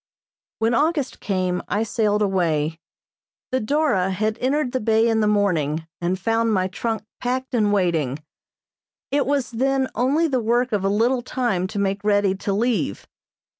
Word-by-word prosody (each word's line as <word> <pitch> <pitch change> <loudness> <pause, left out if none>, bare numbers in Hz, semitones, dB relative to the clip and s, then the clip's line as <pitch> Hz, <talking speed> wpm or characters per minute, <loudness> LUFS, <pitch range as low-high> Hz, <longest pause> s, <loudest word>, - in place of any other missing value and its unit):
When 225 +2 +1
August 295 +2 0
came 185 -2 -1
I 210 +2 0
sailed 210 -1 +1
away. 165 -5 0 0.7
The 260 - +1
"Dora" 220 -7 +1
had 215 +4 -1
entered 265 +1 0
the 260 - -1
bay 220 +1 +3
in 225 -1 +2
the 215 - +2
morning 165 -7 +1 0.2
and 175 +2 0
found 225 +3 +1
my 185 -2 +1
trunk 220 +2 -3 0.2
packed 255 +1 -2
and 215 -4 +2
waiting; 165 -9 +1 0.9
it 285 -1 +1
was 280 -3 0
then 265 +3 +1
only 280 +7 +2
the 260 -5 0
work 240 +3 +1
of 205 -3 0
a 195 - +2
little 235 +5 +2
time 235 -8 -1
to 195 - -7
make 200 0 -1
ready 205 -2 +3
to 195 +1 -3
leave. 205 - 0
215 Hz, 165 wpm, -22 LUFS, 190-250 Hz, 0.9 s, bay